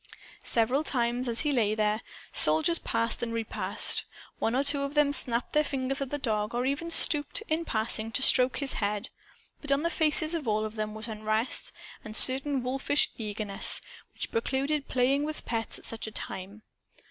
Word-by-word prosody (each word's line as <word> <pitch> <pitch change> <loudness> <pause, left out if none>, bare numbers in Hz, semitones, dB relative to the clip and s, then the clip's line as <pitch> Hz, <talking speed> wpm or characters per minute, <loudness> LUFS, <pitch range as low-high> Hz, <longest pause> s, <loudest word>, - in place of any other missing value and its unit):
Several 245 +6 +3
times, 245 -3 0
as 235 -1 +3
he 295 - 0
lay 220 -5 +1
there, 215 0 0 0.3
soldiers 160 - +5
passed 230 +1 -1
and 235 -1 -3
repassed. 230 -1 -1 0.4
One 225 - 0
or 270 - +2
two 285 0 +3
of 280 +1 -4
them 295 -1 +3
snapped 245 -3 +1
their 300 - +3
fingers 270 -1 -3
at 275 - -3
the 290 - -3
dog 215 -4 -2
or 245 +1 -1
even 285 +5 -2
stooped, 300 +2 +4
in 320 +2 -1
passing, 220 -1 0
to 265 - +1
stroke 255 -1 +4
his 280 -2 -2
head. 210 +2 -3 0.5
But 295 - 0
on 280 +2 +2
the 335 - 0
faces 315 -1 +1
of 315 -7 -3
all 215 0 0
of 215 - -6
them 215 -1 -4
was 215 +1 -6
unrest 215 +2 -1 0.3
and 215 0 -8
a - - +2
certain 265 0 +3
wolfish 270 +3 0
eagerness, 210 -2 0 0.4
which - - -6
precluded 275 +5 -1
playing 265 +3 +1
with 310 +1 -3
pets 225 -1 -3
at - - -11
such 225 -1 -5
a - - -7
time. 200 +1 -6
250 Hz, 190 wpm, -28 LUFS, 220-285 Hz, 0.5 s, soldiers